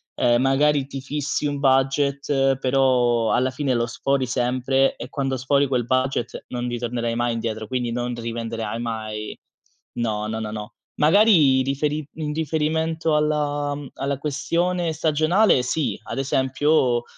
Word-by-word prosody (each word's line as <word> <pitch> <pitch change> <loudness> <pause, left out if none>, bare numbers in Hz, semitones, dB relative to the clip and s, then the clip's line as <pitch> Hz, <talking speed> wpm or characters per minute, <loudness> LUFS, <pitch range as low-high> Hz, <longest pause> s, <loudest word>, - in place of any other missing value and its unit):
ehm, 120 0 +3
magari 140 +1 +2
ti 135 - -6
fissi 145 +2 -3
un 145 -1 -1
budget, 135 0 +2
però 125 -3 +2
alla 130 +1 +2
fine 130 -1 -1
lo 120 0 +1
sfori 135 +2 -1
sempre 130 +2 +1
e - - -7
quando 135 -2 -2
sfori 140 +2 +2
quel 125 -3 0
budget 130 -1 -1
non 125 0 -3
ritornerai 120 -1 -2
mai 120 0 0
indietro, 110 -1 -4
quindi 125 -2 -2
non 120 0 -2
rivenderai 115 -1 -4
mai 110 -2 -5 0.6
no, 110 -2 -2
no, 110 +1 -3
no, 110 -1 -4
no. 105 0 -7 0.3
Magari 155 -6 +5
riferi 145 +3 -1
in 150 -2 -3
riferimento 160 +1 0
alla 145 -1 0
mhmm, 145 -2 -8
alla 140 0 -2
questione 170 +5 -1
stagionale 160 +3 +3
sì, 140 +4 -1
ad - - -6
esempio 130 -1 +1
135 Hz, 145 wpm, -23 LUFS, 120-145 Hz, 0.6 s, Magari